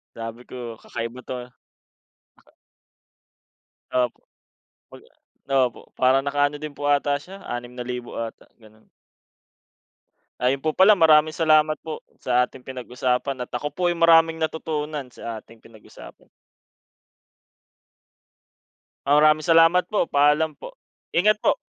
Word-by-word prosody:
Sabi 115 +1 -8
ko, 120 -3 -8
"Kakaiba 115 +2 -6
'to, 130 - -6
ah." - - -36 2.4
Opo, 125 -2 -1 0.6
pag - - -14 0.7
Opo, 120 - -16
parang 130 +1 +3
naka-ano 145 +1 0
din 150 0 -7
po 145 0 -5
ata 145 0 +2
siya, 195 +6 -13
₱6,000 120 0 -6
ata, 115 -1 -6
ganun. 110 -1 -21 1.5
Ayun 135 +3 0
po 155 - +1
pala, 195 +5 +6
maraming 155 -2 +4
salamat 155 -1 +3
po 160 -1 -6 0.2
sa 125 0 +2
ating 130 - -15
pinag-usapan 125 0 -3
at - - -13
ako 145 - -3
po 175 0 0
ay 175 - -4
maraming 165 -1 +5
natutunan 155 -3 -3
sa 115 -2 -7
ating 115 -1 -19
pinag-usapan. 110 -2 -16 2.8
Ah, 145 +1 +4
maraming 155 0 +5
salamat 165 +2 +4
po. 210 -5 +1
Paalam 150 +2 +2
po. - - -12 0.3
Ingat 210 +5 +2
po. - - +2
145 Hz, 120 wpm, -23 LUFS, 125-160 Hz, 2.8 s, pala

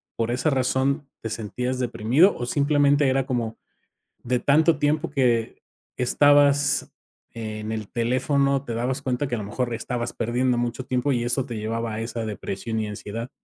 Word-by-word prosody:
por 115 +1 -1
esa 130 +6 +1
razón 135 +2 0
te 110 - -4
sentías 125 +4 -3
deprimido? 125 - +3
O 120 - -3
simplemente 145 +1 +3
era 135 0 +1
como 120 -4 -2 0.7
de 125 0 0
tanto 155 +3 +4
tiempo 150 +1 +1
que 120 -5 +1 0.4
estabas 145 +2 +4 0.4
en 110 -1 -5
el 110 -2 -4
teléfono, 135 +3 +1
te 115 - -4
dabas 125 +4 -1
cuenta 130 +1 -1
que 120 - -2
a - - -3
lo 105 - -4
mejor 120 +3 -2
estabas 120 +1 -3
perdiendo 120 +2 0
mucho 120 +2 -2
tiempo 130 +3 0
y 120 -2 0
eso 120 +2 0
te 120 -4 -6
llevaba 115 +1 -3
a 110 - -3
esa 115 0 -4
depresión 110 +1 -4
y 110 - -2
ansiedad. 110 +4 -6
125 Hz, 170 wpm, -24 LUFS, 115-140 Hz, 0.7 s, tanto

